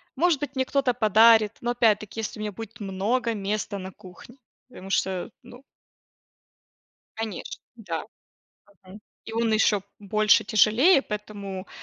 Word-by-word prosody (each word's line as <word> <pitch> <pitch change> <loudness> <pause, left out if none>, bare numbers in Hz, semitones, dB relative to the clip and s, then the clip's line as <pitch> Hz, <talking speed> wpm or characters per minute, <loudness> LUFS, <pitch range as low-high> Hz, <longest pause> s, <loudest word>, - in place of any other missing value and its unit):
Может 330 0 +2
быть, 280 -1 -5
мне 260 - 0
кто-то 270 -2 +1
подарит, 220 -1 +5
но 240 0 -1
опять-таки, 220 -2 +1
если 220 0 -5
у - - -5
меня 210 0 -3
будет 225 +3 -10
много 210 +5 -1
места 205 0 -3
на 185 0 -7
кухне. 190 +8 -15 0.3
Потому 195 -6 -11
что, 190 +1 -1
ну 245 +1 -14 1.5
Конечно. 220 -5 -6
Да. 225 -3 -5 0.8
Мгм. 195 +3 -13 0.2
И 225 - -8
он 230 0 0
ещё 215 -2 +3 0.2
больше, 215 +1 +3
тяжелее, 230 - +4
поэтому 205 -4 -7
215 Hz, 135 wpm, -25 LUFS, 200-240 Hz, 1.5 s, подарит